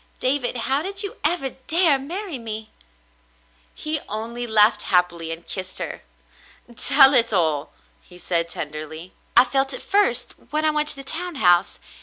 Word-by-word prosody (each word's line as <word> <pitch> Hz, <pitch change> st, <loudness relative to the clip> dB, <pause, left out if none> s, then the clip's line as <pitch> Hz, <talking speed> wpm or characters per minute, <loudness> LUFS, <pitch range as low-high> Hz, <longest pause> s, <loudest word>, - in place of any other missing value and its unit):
David, 255 Hz, -1 st, -1 dB
how 265 Hz, +5 st, +1 dB
did 390 Hz, +4 st, 0 dB
you 400 Hz, -, -7 dB
ever 300 Hz, -4 st, 0 dB, 0.2 s
dare 325 Hz, -4 st, +3 dB
marry 340 Hz, +2 st, -6 dB
me? 220 Hz, -1 st, -6 dB, 1.0 s
He 310 Hz, 0 st, -3 dB
only 230 Hz, +3 st, -6 dB
laughed 215 Hz, 0 st, +4 dB
happily 175 Hz, -3 st, -1 dB
and 165 Hz, +1 st, -8 dB
kissed 185 Hz, -1 st, -7 dB
her. -, -, -6 dB, 0.7 s
"Tell 270 Hz, +3 st, +7 dB
it 230 Hz, -3 st, +7 dB
all,'* 160 Hz, -6 st, -1 dB, 0.3 s
he 180 Hz, -, -16 dB
said 170 Hz, -1 st, -2 dB
tenderly. 155 Hz, +3 st, -8 dB, 0.2 s
"I 245 Hz, -, +8 dB
felt 270 Hz, +1 st, 0 dB
it -, -, -8 dB
first 250 Hz, -, 0 dB, 0.2 s
when 305 Hz, +1 st, -1 dB
I 310 Hz, -, +2 dB
went 300 Hz, 0 st, -1 dB
to -, -, -4 dB
the 275 Hz, -, -10 dB
town 340 Hz, +5 st, -6 dB
house. 175 Hz, -7 st, +2 dB
245 Hz, 160 wpm, -21 LUFS, 180-300 Hz, 1.0 s, I